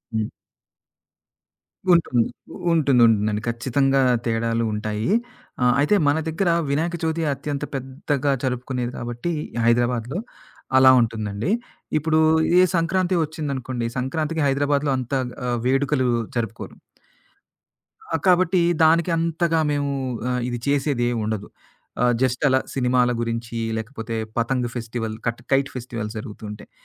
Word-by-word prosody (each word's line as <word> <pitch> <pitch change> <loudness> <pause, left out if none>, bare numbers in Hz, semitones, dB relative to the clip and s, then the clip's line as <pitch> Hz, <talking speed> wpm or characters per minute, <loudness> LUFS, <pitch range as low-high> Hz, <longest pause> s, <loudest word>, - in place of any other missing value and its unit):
హ్మ్. 110 -1 -1 1.6
ఉంటుంది, 125 -9 +3 0.5
ఉంటుంది, 140 -6 +3
ఉంటుందండి. 105 -1 +1
ఖచ్చితంగా 135 +3 +1 0.2
తేడాలు 115 0 0
ఉంటాయి. 105 +1 -2 0.5
ఆహ్, 125 0 +4
అయితే 150 +9 +3
మన 145 +2 +3
దగ్గర 175 +3 0 0.2
వినాయక 160 +5 0
చవితి 160 0 0
అత్యంత 140 +2 -4
పెద్దగా 135 +2 -1
జరుపుకునేది 125 -1 -2
కాబట్టి 120 +8 -4 0.3
హైదరాబాద్‌లో 120 +5 +1 0.6
అలా 130 0 +8
ఉంటుందండి. 110 - -2 0.5
ఇప్పుడు 155 +1 +2 0.4
ఏ - - +8
సంక్రాంతి 180 +2 +1
వచ్చిందనుకోండి, 135 -6 -4
సంక్రాంతికి 155 +5 -1
హైదరాబాద్‌లో 140 +1 +1
అంత 130 +1 -5 0.3
ఆహ్, 120 -1 0
వేడుకలు 135 0 +2 0.3
జరుపుకోరు. 115 0 -4 1.4
ఆహ్, - - 0
కాబట్టి, 180 0 +4 0.2
దానికంతగా 165 0 +2
మేము 145 -1 0 0.4
ఆహ్, 125 0 0
ఇది 120 -1 -3
చేసేదేముండదు. 120 -7 0 0.5
ఆహ్, 125 0 +4
జస్ట్ 130 0 +1
అలా 130 0 +4
సినిమాల 125 -1 +2
గురించి, 115 0 -3 0.2
లేకపోతే 115 0 -5 0.2
పతంగ్ 120 +1 0
ఫెస్టివల్ 115 -2 -4
కట్ 115 +1 -2
కైట్ 135 +1 +2
ఫెస్టివల్స్ 115 -3 -5
జరుగుతూ 110 -1 -9
ఉంటాయి. 105 - -11
130 Hz, 110 wpm, -23 LUFS, 115-145 Hz, 1.6 s, అలా